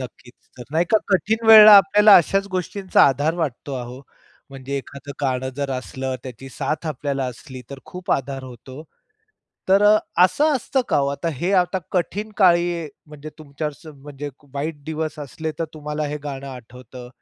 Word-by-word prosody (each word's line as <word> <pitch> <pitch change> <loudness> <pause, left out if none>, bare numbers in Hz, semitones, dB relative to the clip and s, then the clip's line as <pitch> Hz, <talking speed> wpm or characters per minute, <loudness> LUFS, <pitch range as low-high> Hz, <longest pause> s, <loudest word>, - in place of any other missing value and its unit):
नक्कीच. 125 -1 -11 0.2
जर 125 - -8
नाही 165 +2 +2
का 220 - +5
कठीण 220 +4 0
वेळेला 215 -1 +10
आपल्याला 205 +1 +6
अशाच 195 +4 +1
गोष्टींचा 185 +1 0
आधार 145 +4 0
वाटतो 145 -4 -4
अहो. 125 +2 -9 0.5
म्हणजे 135 +1 -6
एखादं 140 +1 -10
गाणं 130 -2 -1
जर 140 -1 -3
असलं, 130 0 -4
त्याची 130 +1 -10
साथ 155 +4 -4
आपल्याला 140 -2 -3
असली, 130 +1 -12
तर 140 - -8
खूप 180 0 -8
आधार 135 0 -3
होतो. 130 +3 -11 0.9
तर 195 +2 +4
अ, 210 +1 +6 0.3
असं 295 - +2
असतं 265 +2 -1
का - - +1
हो 140 - +1
आता 140 +4 -3
हे 175 +9 -2
आता 180 +1 -2
कठीण 205 +4 -2
काळी 175 -4 +2 0.2
म्हणजे 150 0 -11
तुमच्यावर 150 0 -6
स - - -17
म्हणजे 145 +1 -9 0.3
वाईट 145 +1 -4
दिवस 155 -1 -4
असले 155 +3 -6
तर 165 - -1
तुम्हाला 150 0 -4
हे 150 - -4
गाणं 140 -1 -6
आठवतं. 125 0 -11
150 Hz, 165 wpm, -21 LUFS, 135-180 Hz, 0.9 s, वेळेला